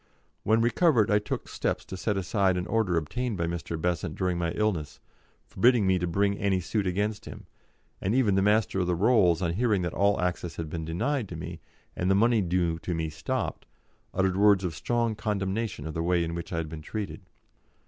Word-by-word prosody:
When 110 +2 +3
recovered, 120 - +3
I 105 - +5
took 105 - -4
steps - - -2
to - - -7
set 100 +2 -1
aside 95 -1 +1
an 90 - -2
order 105 -6 +1
obtained 115 +7 -2
by 85 - 0
Mr. 85 -1 -4
Besant 85 -1 -1
during 90 -2 0
my 85 -1 -1
illness, 100 -9 -1 0.5
forbidding 120 +1 +3
me 95 -1 +3
to 90 - -1
bring 100 +3 +1
any 100 -2 +1
suit 100 +3 -1
against 105 +3 -1
him, - - -9 0.6
and 100 +5 0
even 120 -7 +3
the 95 - +3
Master 105 -1 +2
of 90 - 0
the 90 - +1
Rolls, 95 -4 +3
on 85 -1 0
hearing 105 -2 +1
that 85 - -2
all 100 +1 +2
access 90 -1 -2
had 80 -2 -5
been 80 -1 -4
denied 105 - -1
to 85 - -6
me, 80 - -7 0.4
and 90 - -1
the 95 - +4
money 115 +2 +4
due 85 -2 0
to 85 +2 -3
me 80 -1 -2
stopped, 75 - -3 0.4
uttered 95 0 +1
words 100 -1 +5
of 90 -3 -2
strong 115 +6 0
condemnation 105 -4 -2
of 80 - -5
the 80 - -2
way 85 0 +2
in 85 0 -3
which 85 0 -6
I 85 - -2
had 80 -1 -2
been 75 0 -7
treated. 105 +4 -5
95 Hz, 210 wpm, -27 LUFS, 85-105 Hz, 0.6 s, I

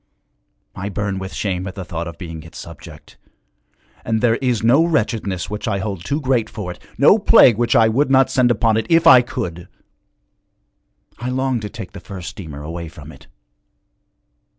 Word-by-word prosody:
I 100 +2 -5
burn 100 -1 -3
with 95 0 -6
shame 95 -2 -3
at 95 - -7
the 95 -3 -6
thought 85 -1 -5
of 85 0 -9
being 80 -3 -8
its 80 +1 -13
subject, 75 -2 -12 0.9
and 110 0 0
there 115 0 +2
is 125 -5 -1
no 130 +8 +5
wretchedness 110 - -1
which 105 +4 -5
I 105 -3 0
hold 95 -3 -4
too 145 +9 -2
great 130 -6 0
for 95 -5 -6
it, 90 - -12 0.2
no 150 - +5
plague 195 - +6
which 120 - +1
I 110 -1 +6
would 130 +6 +1
not 135 -1 +4
send 125 -2 +3
upon 115 -1 +2
it 110 - -2
if 165 0 +4
I 130 -7 +9
could! 85 -7 -6 1.5
I 120 +2 -4
long 130 -1 -1
to 105 -1 -6
take 95 - -9
the 100 - -10
first 90 0 -8
steamer 75 -6 -9
away 85 +2 -6
from 80 - -12
it.' - - -17
105 Hz, 185 wpm, -19 LUFS, 90-125 Hz, 1.5 s, I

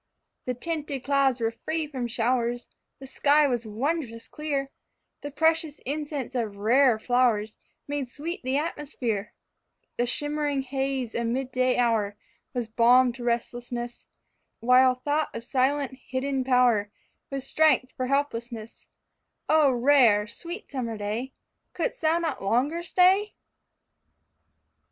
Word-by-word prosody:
The 250 - -2
tinted 290 -1 -4
clouds 275 -2 +2
were 225 -1 0
free 315 +7 -3
from 260 -5 -4
showers, 240 +1 0 0.3
The 270 - -11
sky 290 +3 +3
was 240 -3 -2
wondrous 230 0 -3
clear, 280 -3 -3 0.5
The 290 - -5
precious 320 0 +1
incense 290 -2 -4
of 225 -5 -2
rare 235 +4 +4
flowers 225 -2 +1 0.3
Made 285 -3 -3
sweet 330 +8 -6
the 260 +2 0
atmosphere; 250 -9 -3 0.7
The 240 - +1
shimmering 290 +1 -1
haze 265 -2 -2
of 235 0 -1
mid 255 +2 -2
day 255 0 +1
hour 220 -4 +1 0.4
Was 240 -2 -2
balm 245 +2 +4
to 245 0 -9
restlessness, 240 0 -3 0.5
While 255 +2 +5
thought 290 +4 -1
of 230 - -5
silent 265 +1 0
hidden 265 0 -1
power 250 -5 +3 0.4
Was 275 -1 -4
strength 300 -3 +3
for 255 - -3
helplessness 235 -5 -3 0.6
O 310 -2 +5
rare, 245 -5 +4
sweet 340 - -8
summer 235 -5 -3
day, 215 +6 -3 0.4
Could'st - - -3
thou 320 +1 +3
not 325 -5 -2
longer 260 +11 +1
stay? 375 +4 +3
255 Hz, 130 wpm, -26 LUFS, 235-290 Hz, 0.7 s, While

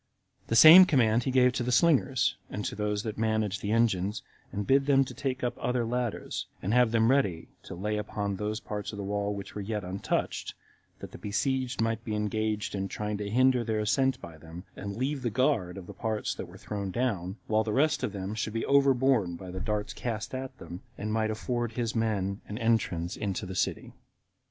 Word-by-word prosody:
The 115 - 0
same 165 +9 +11
command 120 -7 +3
he - - 0
gave 125 -1 +4
to 125 - -2
the 125 +1 -1
slingers, 135 -4 +3
and 105 - -4
to - - -2
those 105 0 -2
that 110 -1 -5
managed 110 -3 0
the 100 - -2
engines, 105 -3 +1 0.3
and 100 0 -3
bid 135 +3 +3
them 135 -1 +4
to 125 - -8
take 130 0 -3
up 120 - -1
other 125 -1 0
ladders, 120 -1 -3
and 100 +4 -2
have 125 -1 +5
them 115 +1 +3
ready 100 -12 +1
to - - -9
lay 105 +4 -2
upon 105 -1 -3
those 105 +2 -2
parts 105 -1 -5
of 105 - -8
the 100 - -4
wall 100 +1 -2
which 100 -1 -8
were 105 - -5
yet 105 +1 -3
untouched, 95 +2 -2 0.5
that - - -8
the - - -10
besieged 130 +4 -1
might 115 0 0
be 110 -2 -3
engaged 105 0 -1
in 95 -1 -2
trying 105 +1 -4
to 100 -1 -3
hinder 125 +2 +3
their 110 -2 -1
ascent 130 +5 +1
by 80 -2 -11
them, 80 +3 -10
and 100 +1 -6
leave 135 +3 -1
the 120 - 0
guard 110 -7 +1
of 95 - -8
the - - -9
parts 110 -2 -2
that - - -7
were - - -13
thrown 100 -2 -4
down, 95 -5 -2
while 110 0 +2
the 110 - -3
rest 150 +5 +2
of 125 -5 -1
them 95 +1 -4
should 110 0 -3
be 115 - -2
overborne 135 -8 +3
by 90 +1 -8
the 95 - -5
darts 105 0 -2
cast 110 -3 -4
at 130 0 -5
them, 90 +1 -9 0.2
and 105 +1 -3
might 110 -1 +1
afford 120 +1 -2
his 115 -1 -2
men 105 -3 -1
an 105 - -5
entrance 110 -7 0
into 100 -1 -3
the 95 - -6
city. 90 - -2
110 Hz, 215 wpm, -29 LUFS, 100-125 Hz, 0.5 s, same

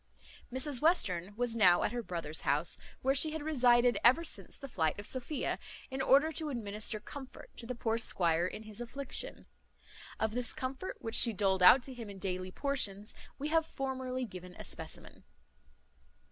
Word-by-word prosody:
Mrs 260 0 +2
Western 200 - +2
was 240 0 -1
now 180 -6 +5
at - - 0
her 240 0 -3
brother's 165 -7 -4
house, 145 +5 0 0.2
where 265 +1 +3
she 305 +3 +5
had 315 -2 -4
resided 245 -5 +4
ever 260 +8 +6
since 335 - -3
the 275 - -8
flight 160 - 0
of 205 - -7
Sophia, 260 +5 -2 0.3
in 265 0 -2
order 280 +4 +4
to 315 0 -3
administer 215 -3 -2
comfort 265 +5 -11
to 230 - -1
the 250 - -4
poor 230 -1 -1
squire 170 -5 +2
in 210 +3 -7
his 215 +1 -7
affliction. 265 +3 -3 0.7
Of 220 -1 0
this 245 +2 -2
comfort, 265 +8 -5
which 225 - -4
she 235 -1 +5
doled 195 -2 +1
out 185 +8 +8
to 265 - -7
him 230 -4 -8
in 200 - -9
daily 185 -1 -3
portions, 210 -6 -1 0.2
we 290 +2 -3
have 325 +1 +3
formerly 260 -4 -4
given 180 -4 -10
a - - -9
specimen. - - -5
240 Hz, 175 wpm, -32 LUFS, 200-270 Hz, 0.7 s, out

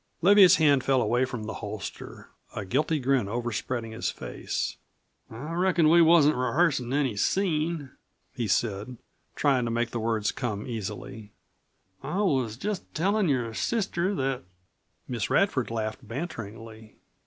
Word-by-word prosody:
Leviatt's 195 0 +8
hand 145 -4 +4
fell 135 -1 +3
away 120 +3 +2
from 125 -4 -6
the 110 - -5
holster, - - -7 0.3
a 105 - -4
guilty 150 +10 +1
grin 135 -5 +1
overspreading 120 0 -3
his 110 - -2
face. - - -4 0.5
"I 140 +9 -7
reckon 175 -2 +3
we 170 +1 +6
wasn't 160 -4 +5
rehearsin' 130 -2 +1
any 135 -5 +1
scene," 155 - 0 0.4
he 120 -4 -2
said, 105 +4 -1 0.4
trying 135 -4 +2
to - - -2
make 120 0 -1
the 120 - -3
words 110 -2 0
come 110 -5 -4
easily. 110 0 -6 0.7
"I 150 +7 -4
was 130 - 0
just 200 +5 -4
tellin' 195 +3 +1
your 120 -5 0
sister 195 - -1
that 135 -4 -1 0.4
" - - -46
Miss 120 -5 -3
Radford 195 - +2
laughed 110 +2 -4
banteringly. 115 - -7
130 Hz, 140 wpm, -27 LUFS, 115-160 Hz, 0.7 s, Leviatt's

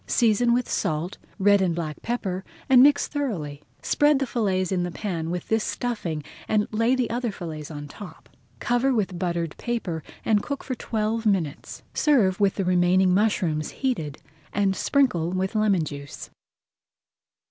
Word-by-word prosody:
Season 235 +1 +3
with 245 +1 +2
salt, 160 +4 -2 0.2
red 200 0 +4
and 175 -3 +1
black 155 -3 -4
pepper, 195 -6 -2 0.2
and 260 -2 +7
mix 285 +1 +5
thoroughly. 175 - -3 0.2
Spread 295 0 +3
the 270 - 0
fillets 195 -7 0
in 185 -2 +1
the 175 - -1
pan 170 -3 -3
with 175 0 -4
this 220 -1 +1
stuffing 180 -11 -3 0.2
and 210 -1 +2
lay 230 +4 +2
the 255 -2 0
other 240 -1 -1
fillets 160 -6 -7
on 145 -2 -7
top. 190 +6 -11 0.3
Cover 245 +2 +1
with 190 -5 -1
buttered 170 -3 -2
paper 215 -9 -2 0.2
and 210 -2 +3
cook 280 +3 -4
for 260 - -3
twelve 225 -1 -1
minutes. 175 -8 -1
Serve 225 -12 +3
with 200 -2 +3
the 195 - -1
remaining 180 +1 +4
mushrooms 180 -7 +1
heated 165 - -2 0.3
and 195 -1 +1
sprinkle 220 - +2
with 185 +2 -1
lemon 210 -5 +2
juice. 140 -2 -8
195 Hz, 160 wpm, -25 LUFS, 170-235 Hz, 0.3 s, and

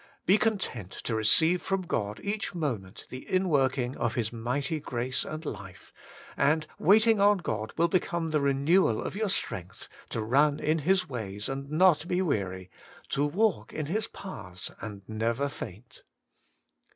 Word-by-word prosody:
Be 200 +4 +5
con 220 -1 +2
tent 115 - -5
to 115 - -5
receive 160 +11 +4
from 195 -1 -1
God 105 - -2
each 205 -2 -2
moment 115 - -3
the 130 - -7
inworking 135 -9 +1
of 120 -1 -1
His 115 -1 -1
mighty 130 +7 -1
grace 125 -2 -2
and 155 +1 -6
life, 95 -7 -8 0.4
and 150 +2 +2
waiting 220 +3 +5
on 205 0 +6
God 110 - -3
will 170 +1 +4
become 170 -2 0
the 150 -2 +2
renewal 140 - +3
of - - -4
your 215 0 0
strength 95 - -3 0.2
to 115 - -2
run 145 +6 +3
in 155 +1 +1
His 185 +5 +2
ways 105 -5 -5
and 135 +1 -4
not 170 +1 +4
be 180 - 0
weary, 95 - -2 0.4
to 140 - +1
walk 195 +8 +1
in 155 - -3
His 205 +8 -1
paths 90 - -7
and 100 -3 -7
never 115 +5 0
faint. 115 -3 -9
140 Hz, 160 wpm, -29 LUFS, 115-180 Hz, 0.4 s, on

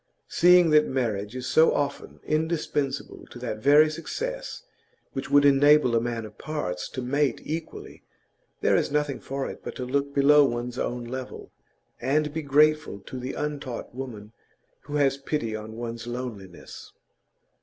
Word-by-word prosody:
Seeing 175 -1 +5
that 150 0 +5
marriage 115 -4 -2
is 130 0 -5
so 160 +5 +4
often 140 -1 -3
indispensable 155 -3 -2
to - - -12
that 120 -3 -5
very 145 +6 +6
success 475 - -5 0.5
which 135 - -5
would 145 0 +5
enable 145 -2 +5
a 115 - +3
man 115 -2 -3
of 105 - -13
parts 90 -13 -4
to 130 - -5
mate 140 0 0
equally, 160 +1 -6 0.6
there - - +3
is - - +1
nothing 145 -2 0
for 135 0 -4
it - - -8
but - - -6
to 125 - -4
look 140 +2 -1
below 145 +1 +6
one's 120 -1 -2
own 120 0 -2
level, 130 +2 -7 0.5
and 145 +4 +1
be 160 - -2
grateful 150 -5 +2
to 130 +6 -8
the 130 +2 -5
untaught 145 -6 -5
woman 115 -5 -7 0.5
who 145 - -5
has 140 -2 +2
pity 125 -6 -2
on 110 +1 -8
one's 115 0 -6
loneliness. 115 -7 -8
135 Hz, 155 wpm, -26 LUFS, 120-150 Hz, 0.6 s, very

